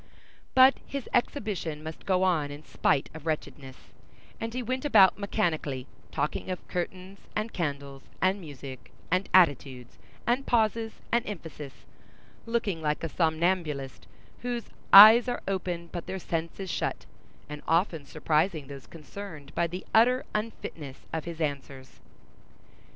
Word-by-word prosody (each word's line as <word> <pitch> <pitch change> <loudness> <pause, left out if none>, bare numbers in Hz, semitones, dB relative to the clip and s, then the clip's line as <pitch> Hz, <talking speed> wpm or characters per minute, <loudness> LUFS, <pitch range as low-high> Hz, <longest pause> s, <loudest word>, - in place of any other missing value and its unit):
But 260 +1 +8
his 275 -3 -5
exhibition 195 - -1
must 160 0 -8
go 185 -1 +3
on 165 -6 +2
in 145 +1 -9
spite 135 - 0
of 160 0 -9
wretchedness; 140 -4 -4 0.6
and 225 0 -4
he 250 +1 -3
went 255 +2 -2
about 195 -10 +6
mechanically, 160 -10 -1 0.3
talking 150 - -2
of 185 - -5
curtains 185 +2 -5 0.2
and 215 +2 -2
candles, 140 -4 -4 0.2
and 190 +2 +1
music, 140 -5 -10 0.2
and 185 +2 +1
attitudes, 140 -8 +2 0.3
and 250 +3 0
pauses, 225 -1 +1 0.2
and 235 0 +3
emphasis, 155 -8 -8 0.6
looking 225 -7 -1
like 150 0 -1
a 165 - -2
somnambulist 160 -4 -1 0.3
whose 240 -1 -4 0.2
"eyes 220 +5 +11
are 245 - -3
open 180 -3 -2
but 175 -2 -6
their 190 - -3
sense 165 -1 -4
is 190 -3 -4
shut," - - -3 0.4
and 150 0 -7
often 165 -2 +1
surprising 155 +1 0
those 135 -1 -10
concerned 160 -2 -10
by 170 - +1
the 180 +3 -7
utter 250 +3 +4
unfitness 165 -10 -5
of 160 -1 -3
his 170 -1 -7
answers. 140 -3 -5
170 Hz, 140 wpm, -28 LUFS, 150-205 Hz, 0.6 s, eyes